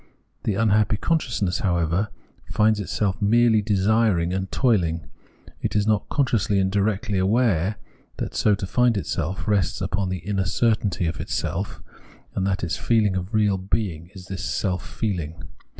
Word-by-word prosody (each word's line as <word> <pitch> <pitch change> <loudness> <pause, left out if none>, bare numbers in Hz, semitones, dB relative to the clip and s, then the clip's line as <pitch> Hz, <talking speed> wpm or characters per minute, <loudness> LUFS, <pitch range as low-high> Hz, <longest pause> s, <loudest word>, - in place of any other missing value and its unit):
The 105 - +1
unhappy 110 0 +2
con 165 +8 +1
sciousness, 100 - -2
however, 85 +1 +1 0.4
finds 110 0 +3
itself 100 0 -1
merely 115 +1 +4
desiring 100 -3 +2
and 95 0 -3
toil 115 -8 +3
ing; 80 -1 -3 0.6
it - - -2
is 105 -1 +2
not 105 -1 +1
consciously 115 -7 +1
and 95 -1 +2
directly 100 0 0
aware 100 -2 +2 0.4
that - - -4
so 105 - +3
to 95 - -4
find 120 +3 +2
itself 95 0 -3
rests 100 -5 +1
upon 95 0 -1
the 95 - -2
inner 100 -2 0
certainty 105 -3 +1
of 80 0 -2
its - - -3
self, 95 +4 -3 0.5
and 95 0 -1
that 95 -1 -1
its 85 - -2
feehng 110 -4 +2
of 95 +4 -3
real 105 -3 +2
being 95 -4 -2
is 90 -2 -10
this 95 -2 -6
self 90 +2 -1 0.2
feehng. 85 -7 -2
100 Hz, 165 wpm, -24 LUFS, 95-110 Hz, 0.6 s, merely